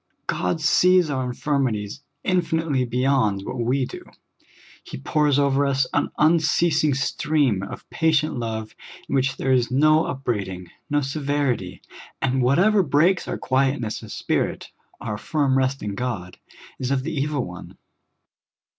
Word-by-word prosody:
God 165 - -1
sees 180 0 +4
our 130 -2 -1
infirmities 125 -3 -2 0.2
infinitely 160 -7 0
beyond 125 -5 +1
what 130 - -5
we 125 +3 +1
do; - - -9 0.8
He - - -8
pours 145 - +1
over 140 0 +2
us 135 -1 +1
an 145 - +1
unceasing 155 -1 +3
stream 140 -5 +1
of 100 - -8
patient 155 -2 +1
love, 110 -2 -4 0.3
in - - -5
which 135 0 +1
there 135 - 0
is 125 -2 +2
no 155 +4 +4
upbraiding, 100 -9 -3 0.2
nor 145 0 +2
severit}^; 135 - -2 0.4
and 130 0 0
whatever 180 +12 +4
breaks 170 +4 +2
our - - -3
quietness 130 -4 0
of - - -10
spirit, - - -2 0.3
our 105 0 -4
firm 145 -2 0
rest 135 +1 0
in 105 -1 -3
God, 100 -6 -4 0.4
is 130 - -2
of 135 -1 0
the 160 +3 -4
evil 145 -2 -1
one. 90 0 -10
135 Hz, 140 wpm, -23 LUFS, 120-150 Hz, 0.8 s, sees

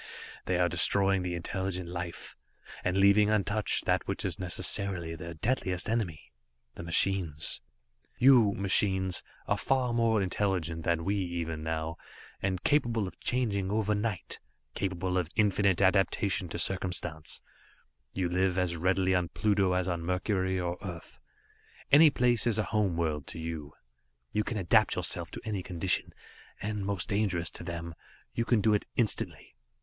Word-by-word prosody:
"They 90 - +1
are 90 0 +3
destroying 95 +3 +3
the 90 -1 -3
intelligent 90 +1 -3
life 85 0 -6 0.5
and 90 +1 0
leaving 100 +2 +5
untouched 105 0 +2
that - - +1
which - - -3
is - - -2
necessarily 90 -1 -1
their 85 +1 -8
deadliest 95 -2 -1
enemy 100 - -2 0.4
the - - -9
machines. 85 -2 +1 0.6
"You 125 -6 +6
machines 95 -1 +2 0.3
are - - +1
far 130 -3 +1
more 115 -2 +2
intelligent 90 -4 -1
than 85 -2 0
we 100 - +1
even 85 -4 -3
now, 80 +1 -3 0.4
and 95 -2 -2
capable 120 -8 +1
of - - -11
changing 105 -7 0
overnight, 105 -1 -1 0.3
capable 95 -1 -1
of 85 -3 -3
infinite 100 -3 +2
adaptation 95 -1 +2
to - - -5
circumstance; 85 -4 -1 0.7
you 95 -2 -1
live 90 +1 +1
as 90 -2 0
readily 95 +2 +1
on 90 -2 +1
Pluto 100 -3 +1
as 90 0 0
on 85 -2 -2
Mercury 95 +1 -1
or 90 0 -3
Earth. 85 -5 -8 0.7
Any 155 +2 +8
place 120 -3 +2
is 115 - +3
a 110 - +1
home 105 -6 0
world 75 -4 -1
to - - -7
you. 80 -3 -6 0.6
You 105 - 0
can 110 - -3
adapt 95 -4 +3
yourselves - - -2
to - - -8
any 105 -4 -2
condition. 90 0 0 0.5
And 105 -1 -3
most 100 -3 -1
dangerous 100 -6 0
to - - -5
them 85 -1 -5 0.4
you 115 - -1
can 115 -3 +2
do 110 +1 +3
it 105 - 0
instantly. 115 -4 -1
95 Hz, 150 wpm, -30 LUFS, 85-105 Hz, 0.7 s, Any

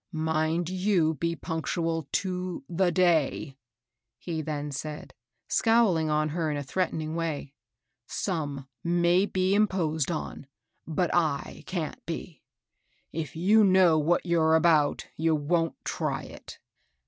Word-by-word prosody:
" - - -56 0.2
Mind 160 +2 +1
you 185 -3 +1
be 170 +3 -2
punctual 165 -1 -2
to 180 -2 -2
the 180 +1 +1
day," 160 -5 +2 0.6
he 160 +1 -4
then 150 -1 -4
said, 150 +2 -6 0.3
scowling 215 -9 +3
on 155 0 +1
her 160 0 -1
in 150 - -1
a 145 - -3
threatening 160 0 -2
way. 160 -4 -3 0.3
" - - -56 0.2
Some 145 -7 -3 0.2
may 175 +3 +3
be 185 0 +1
imposed 180 -8 +1
on, 155 -4 -5 0.4
but 165 +2 0 0.3
Z - - -11
can't 170 -5 -4
be. 165 -2 -6 0.7
If 155 -3 -5
you 205 +7 +4
know 185 -4 +5
what 165 +5 +1
you're 160 -2 +3
about, 160 -3 +3
you 160 0 +2
wont 165 +2 0
try - - -2
it. - - -11
165 Hz, 135 wpm, -27 LUFS, 155-180 Hz, 0.7 s, know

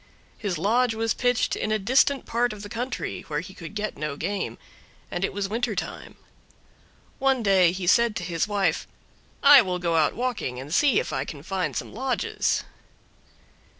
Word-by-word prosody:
His 195 -6 -2
lodge 225 +6 +2
was 225 0 0
pitched 245 -1 +1
in 215 - -2
a 215 - +3
distant 260 +6 +2
part 240 0 0
of 210 -1 -10
the 205 - -8
country, 245 +4 -4
where 150 -1 -2
he 185 +2 -11
could 175 +2 -10
get 210 -5 -3
no 150 -1 -3
game, 200 +5 -3 0.5
and 175 - -3
it - - 0
was 200 0 -2
winter 225 +1 -1
time. - - -6 1.0
One 270 -3 +2
day 190 -4 +5
he 185 0 -4
said 235 +4 +4
to 180 - -3
his 170 +1 -1
wife, 205 -2 0 0.6
"I 280 -1 +10
will 185 -4 -2
go 170 -2 0
out 155 -2 +2
walking 235 - -2
and 140 +4 -7
see 280 -2 +4
if - - -4
I 135 -1 -1
can 145 -2 -8
find 185 +1 -2
some - - -4
lodges." 255 +4 -1
205 Hz, 185 wpm, -25 LUFS, 175-240 Hz, 1.0 s, I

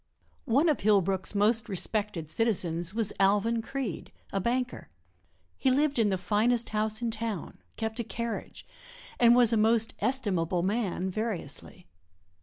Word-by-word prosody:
One 275 +9 +4
of 305 - +2
Hillbrook's 195 -1 +1
most 220 +2 +2
respected 200 -3 -1
citizens 175 -4 0
was 225 -3 +1
Alvan 210 +4 +2
Creede, 240 - -5 0.2
a 195 - +1
banker. 245 - -2 0.7
He 265 - +2
lived 280 0 +2
in 215 -2 +3
the 190 - 0
finest 220 +6 +1
house 215 +1 0
in 230 - 0
town, 220 -5 -5 0.2
kept 220 +1 -4
a - - 0
carriage 235 +1 -5 0.5
and 235 0 +6
was 240 -2 +5
a - - +3
most 225 +1 +3
estimable 185 -9 0
man 190 -2 -1
variously. 190 -3 -5
220 Hz, 140 wpm, -28 LUFS, 195-235 Hz, 0.7 s, and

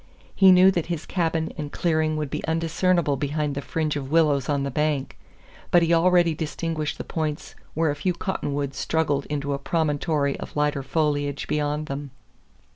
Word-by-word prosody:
He 190 -1 +7
knew 185 +1 +7
that 170 -4 -2
his 170 -3 -3
cabin 165 -3 -1
and 145 -1 -4
clearing 155 -2 0
would 150 -3 -3
be - - -3
undiscernible 165 -1 +1
behind 145 +1 -1
the 140 - -3
fringe 155 0 -2
of 135 -2 -4
willows 150 -4 +2
on 140 -1 +1
the 140 - -2
bank, 150 -1 -1 0.5
but 175 -1 +5
he 165 +1 +2
already 175 0 +4
distinguished 155 0 -3
the - - -5
points 155 -2 -4 0.2
where 160 -1 +2
a - - -3
few 165 +5 -1
cottonwoods 145 -6 -3
struggled 150 -4 0
into 145 -1 -2
a 140 - -3
promontory 150 -2 0
of - - -8
lighter 150 -1 +1
foliage 145 0 -1
beyond 150 0 -1
them. 140 0 -5
150 Hz, 175 wpm, -24 LUFS, 145-165 Hz, 0.5 s, He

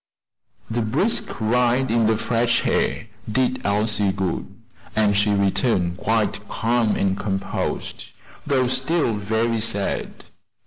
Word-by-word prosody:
The 120 +1 -1
brisk 140 - 0
ride 125 +3 +2
in 115 -1 +3
the 110 -1 +2
fresh 115 +1 +1
air - - 0 0.3
did 130 +2 0
Elsie 105 -1 +1
good, 95 -3 -2 0.5
and 105 -2 +3
she 105 +1 +3
returned 100 -3 +1
quite 105 -1 -1
calm 115 -1 +1
and 95 -1 +1
composed, 95 -1 -3 0.4
though 130 -2 +2
still 130 +2 0
very 110 +2 0
sad. 100 -3 -2
110 Hz, 120 wpm, -22 LUFS, 100-120 Hz, 0.5 s, in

